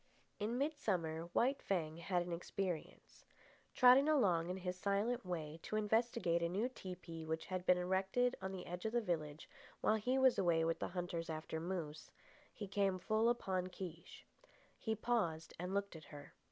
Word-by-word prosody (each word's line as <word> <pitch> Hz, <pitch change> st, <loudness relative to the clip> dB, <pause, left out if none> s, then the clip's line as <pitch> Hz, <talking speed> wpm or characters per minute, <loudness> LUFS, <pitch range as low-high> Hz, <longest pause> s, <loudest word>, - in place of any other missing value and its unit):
In 220 Hz, +4 st, -1 dB
midsummer 185 Hz, -, -1 dB
White 265 Hz, +8 st, +2 dB
Fang 160 Hz, -5 st, -1 dB
had 175 Hz, 0 st, 0 dB
an 175 Hz, -, -4 dB
experience. 175 Hz, 0 st, -4 dB, 0.5 s
Trotting 255 Hz, +4 st, +7 dB
along 180 Hz, -, +3 dB
in 185 Hz, -, -2 dB
his 180 Hz, -1 st, -3 dB
silent 205 Hz, +6 st, 0 dB
way 165 Hz, -4 st, -4 dB
to -, -, -4 dB
investigate 215 Hz, -5 st, +2 dB
a 170 Hz, -, +1 dB
new 205 Hz, +7 st, 0 dB
tepee 180 Hz, -7 st, -7 dB
which 160 Hz, 0 st, -3 dB
had 185 Hz, -1 st, -4 dB
been 180 Hz, -, +6 dB
erected 190 Hz, +7 st, +1 dB
on 190 Hz, 0 st, -3 dB
the 190 Hz, -2 st, -6 dB
edge 180 Hz, +2 st, -6 dB
of 220 Hz, -, -1 dB
the 240 Hz, -, +4 dB
village 155 Hz, -6 st, -3 dB, 0.3 s
while 220 Hz, -, +3 dB
he 250 Hz, +5 st, +1 dB
was 260 Hz, -1 st, +5 dB
away 165 Hz, -3 st, +3 dB
with 165 Hz, 0 st, 0 dB
the -, -, -1 dB
hunters 175 Hz, -2 st, -3 dB
after 160 Hz, 0 st, -3 dB
moose, 165 Hz, -3 st, -4 dB, 0.4 s
he 205 Hz, -, -6 dB
came 195 Hz, -1 st, +1 dB
full 215 Hz, +5 st, +2 dB
upon 190 Hz, -6 st, 0 dB
Kiche. 180 Hz, -3 st, -8 dB, 0.5 s
He 220 Hz, -1 st, -1 dB
paused 200 Hz, -9 st, 0 dB
and 180 Hz, +2 st, -3 dB
looked 200 Hz, -2 st, -1 dB
at 160 Hz, -, -10 dB
her. 145 Hz, -1 st, -11 dB
185 Hz, 175 wpm, -38 LUFS, 170-215 Hz, 0.5 s, Trotting